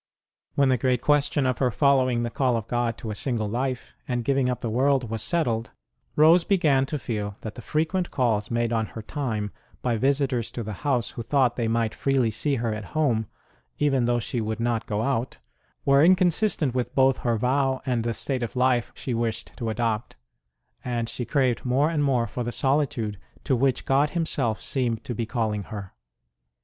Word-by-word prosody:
When 140 -1 +4
the 130 -2 +2
great 125 0 +2
question 145 -1 +2
of 130 -2 0
her 130 - +3
following 130 0 +2
the 120 - -2
call 125 -2 +1
of 110 - -4
God 120 -1 -1
to 110 - -5
a - - -2
single 110 -1 -1
life, 125 +3 -3
and 120 -1 -1
giving 135 -1 +2
up 125 - -2
the 115 - -2
world, 130 -1 +2
was 110 -2 -2
settled, 115 -3 0 0.5
Rose 165 +3 +6
began 150 -9 +2
to 150 - -2
feel 105 -6 -4
that 110 - -6
the - - -9
frequent 165 +6 -1
calls 110 -5 0
made 120 0 0
on 110 -1 0
her 110 - -8
time 110 -6 -3 0.3
by 120 -2 +1
visitors 135 -2 +1
to 120 - -4
the 110 0 -5
house, 130 -5 0
who - - -6
thought 125 0 +2
they 115 -2 -1
might 115 -1 0
freely 135 -5 +1
see 140 +7 0
her 115 -3 -1
at 105 -1 -5
home, 120 -8 +2 0.5
even 135 -4 +2
though 120 0 +2
she 120 +1 -3
would 110 0 -3
not 115 -1 -1
go 105 0 -1
out, 130 -1 -1 0.5
were 140 +1 +5
incon 180 +1 +5
sistent 165 - 0
with 125 -1 -2
both 135 -1 +4
her 120 -2 0
vow 130 +3 +1
and 125 -4 0
the 115 -1 -2
state 130 +1 -2
of 120 0 -4
life 125 -2 +2
she 130 - -4
wished 115 -2 -2
to 115 - -3
adopt; 115 -1 -2 0.7
and 120 -2 -2
she 120 - -4
craved 130 -4 +1
more 135 +5 +2
and 150 -3 +1
more 130 -4 +2
for 125 - -4
the 120 - -3
solitude 130 -7 0 0.2
to 130 - +1
which 130 +1 +1
God 140 +3 +3
Himself 140 -10 -1
seemed 120 -4 -1
to 120 - -4
be 115 0 -3
calling 110 -4 -1
her. 100 -4 -7
125 Hz, 200 wpm, -25 LUFS, 115-135 Hz, 0.7 s, Rose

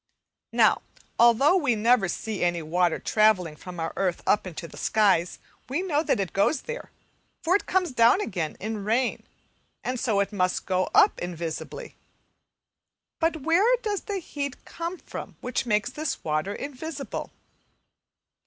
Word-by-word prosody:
Now, - - +4 0.4
although 240 +8 +6
we 285 -10 +2
never 220 -1 +3
see 210 +2 -3
any 175 -1 +1
water 175 +2 +1
travelling 205 -7 +2
from 180 +2 -9
our 165 0 -3
earth 185 -3 -1
up 205 - +2
into 170 -1 -7
the - - -14
skies, 195 -5 +2 0.3
we 295 +8 -1
know 305 -6 +1
that 315 - +1
it 195 -3 -2
goes 230 +9 +2
there, 480 +1 -6 0.5
for 350 +3 +3
it 405 - 0
comes 370 -4 +1
down 235 +6 +5
again 175 - -3
in 215 0 -4
rain, 235 +4 +1 0.6
and 255 0 -2
so 225 -6 +1
it 200 +2 0
must 185 -2 0
go 185 -1 0
up 420 -1 +5
invisibly. 170 -2 -5 1.2
But 325 -3 0
where 390 - +4
does 415 -3 -1
the 405 -2 -2
heat 285 -6 -5
come 340 +2 -5
from - - -8
which 250 0 -2
makes 210 -2 +1
this 305 -2 -4
water 155 +6 -1
invisible? 280 +1 -6
225 Hz, 155 wpm, -26 LUFS, -, 1.2 s, although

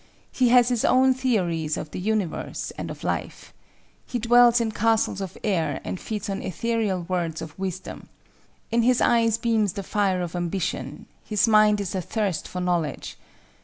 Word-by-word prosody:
He 250 -2 +2
has 245 0 +5
his 245 -3 0
own 260 0 +4
theories 180 -12 0
of 155 - -6
the - - -5
universe 205 -3 -2
and - - -5
of - - -8
life. - - -4 0.5
He 245 - -2
dwells 240 +1 +5
in 230 -2 -1
castles 220 -2 +1
of 190 -3 -6
air 185 -6 0
and 185 - -5
feeds 215 -1 -5
on 195 -1 -3
ethereal 200 0 -1
words 170 -2 -2
of 155 - -7
wisdom. 190 -1 -6 0.6
In 235 +1 +3
his 250 +1 +3
eyes 230 -2 +3
beams 225 -5 +1
the 200 - -5
fire 190 -3 0
of 175 0 -6
ambition; 175 +1 -3 0.2
his 210 0 +1
mind 215 -1 +5
is 195 -3 -3
athirst 190 -2 -2
for 180 - -6
knowledge. 175 -5 -2
205 Hz, 165 wpm, -24 LUFS, 180-230 Hz, 0.6 s, has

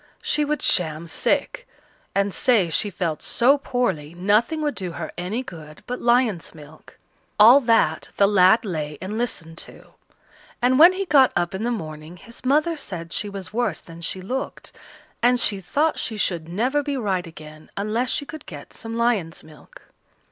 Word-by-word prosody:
She 300 0 +1
would 300 +1 -2
sham 160 -1 +1
sick, - - -1 0.5
and 200 0 +1
say 215 -10 +3
she 205 - +1
felt 170 -5 -3
so 270 +4 +3
poorly, 190 - -2
nothing 215 - +1
would 295 -1 0
do 180 -3 -5
her 160 -1 -6
any 195 +8 -3
good 155 -8 -11
but 250 - -5
lion's 235 -9 +1
milk. 155 0 -15 0.4
All 235 +6 +9
that 230 -4 +2
the 200 - +5
lad 205 +3 +5
lay 150 -6 -4
and 205 +4 -5
listened 165 -9 -4
to; - - -11 0.7
and 255 +2 +3
when 345 +4 +9
he 390 +1 -3
got 280 -6 +5
up 175 +1 0
in 190 - -4
the 240 - 0
morning 155 -6 -6
his 235 +8 -12
mother 300 +6 +2
said 175 - -6
she 205 - -2
was 195 0 -7
worse 240 +2 -1
than 165 0 -13
she 185 +2 -2
looked, 255 +8 -5 0.5
and 245 +1 +4
she 200 -4 0
thought 300 - 0
she 220 - -4
should 170 -5 -2
never 250 +11 0
be 285 -1 -3
right 190 -7 -1
again 155 -1 -13
unless 220 +5 0
she 285 - 0
could 310 0 -10
get 150 -6 -10
some 225 0 -6
lion's 220 -9 0
milk. 155 -1 -17
205 Hz, 175 wpm, -23 LUFS, 170-250 Hz, 0.7 s, All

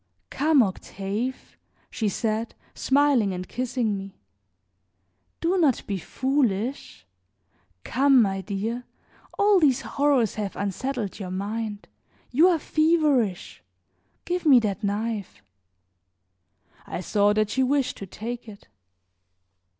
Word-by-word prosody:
"Come, 295 -2 +4
Octave," 200 +5 -4 0.3
she 215 -3 -1
said, 220 +2 -2 0.2
smiling 265 -7 +2
and 180 0 -5
kissing 245 -3 -1
me, 195 0 -10 1.2
"do 360 +3 +1
not 290 -8 +2
be 195 -2 -3
foolish. 250 - -1 0.8
Come, 270 +1 +4
my 195 -4 +1
dear, 220 +5 -4 0.5
all 405 -2 +5
these 280 -7 +3
horrors 275 -6 +1
have 200 -2 -4
unsettled 210 +2 -3
your 190 -3 -5
mind; 205 +2 -4 0.4
you 310 +8 +5
are 355 -2 +3
feverish. 300 - +1 0.6
Give 360 +1 -2
me 290 -6 +7
that 210 -1 -2
knife." 205 - -3 1.4
I - - -4
saw 205 +2 +2
that 215 0 +1
she 265 - +1
wished 270 0 +1
to 195 - -8
take 235 +4 -6
it. 200 - -14
230 Hz, 110 wpm, -25 LUFS, 200-275 Hz, 1.4 s, me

